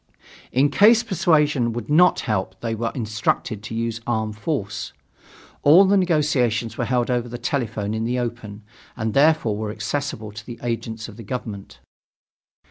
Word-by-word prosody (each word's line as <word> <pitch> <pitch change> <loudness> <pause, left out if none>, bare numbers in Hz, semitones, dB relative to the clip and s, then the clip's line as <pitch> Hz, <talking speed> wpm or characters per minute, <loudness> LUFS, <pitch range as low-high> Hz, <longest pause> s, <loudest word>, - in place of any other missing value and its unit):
In 140 +3 +3
case 220 +7 +6
persuasion 150 - +2
would 120 - -5
not 175 +5 +4
help 95 -5 -2
they 115 -1 -2
were 115 +1 -2
instructed 110 -2 -1
to 110 +1 -7
use 115 0 -2
armed 110 -2 -1
force. 110 -4 -3 0.7
All 165 +7 +7
the 195 +1 +3
negotiations 140 - +1
were 120 - -2
held 125 +1 0
over 120 -1 -1
the 120 - -6
telephone 110 -5 -2
in 110 0 -2
the 120 +2 -1
open, 115 -4 -5 0.3
and 110 -2 -2
therefore 145 -7 +3
were 110 0 -3
accessible 110 +1 -4
to 105 +1 -9
the 120 0 -9
agents 115 -2 -4
of 110 - -12
the 115 - -9
government. 105 -3 -7
115 Hz, 160 wpm, -22 LUFS, 110-140 Hz, 0.7 s, All